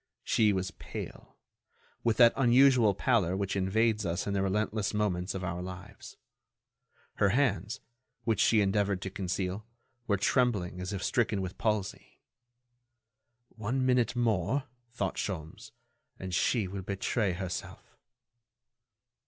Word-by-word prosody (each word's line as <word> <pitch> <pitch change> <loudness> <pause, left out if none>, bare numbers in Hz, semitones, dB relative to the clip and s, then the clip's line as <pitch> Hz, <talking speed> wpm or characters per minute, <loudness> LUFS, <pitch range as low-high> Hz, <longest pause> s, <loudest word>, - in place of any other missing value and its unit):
She 110 -2 +3
was 95 -1 -2
pale—with 115 +4 -7
that 120 -1 +7
unusual 125 -4 +5
pallor 100 -6 +1
which 100 0 -2
invades 105 +3 +1
us 85 -1 -2
in 100 - -2
the 100 - +1
relentless 105 +1 -1
moments 95 -3 -1
of 95 - -4
our 90 0 -3
lives. 95 +3 -9 1.0
Her 100 - +3
hands, 105 -4 0 0.4
which 115 -3 0
she 110 -2 +4
endeavored 100 -1 +1
to 95 - -4
conceal, 95 +1 -3 0.4
were 100 - +2
trembling 100 -5 +1
as 90 +2 -4
if 100 -3 -4
stricken 110 -4 +1
with 95 -1 -5
palsy. 105 -3 -2 1.3
"One 120 +4 -2
minute 125 -2 +2
more," 120 +2 +1 0.3
thought 100 -5 -3
Sholmes, 80 -5 -5 0.5
"and 95 -1 -6
she 105 +3 +1
will 95 +1 -5
betray 100 +1 -1
herself." 90 -1 -6
100 Hz, 125 wpm, -30 LUFS, 95-115 Hz, 1.3 s, that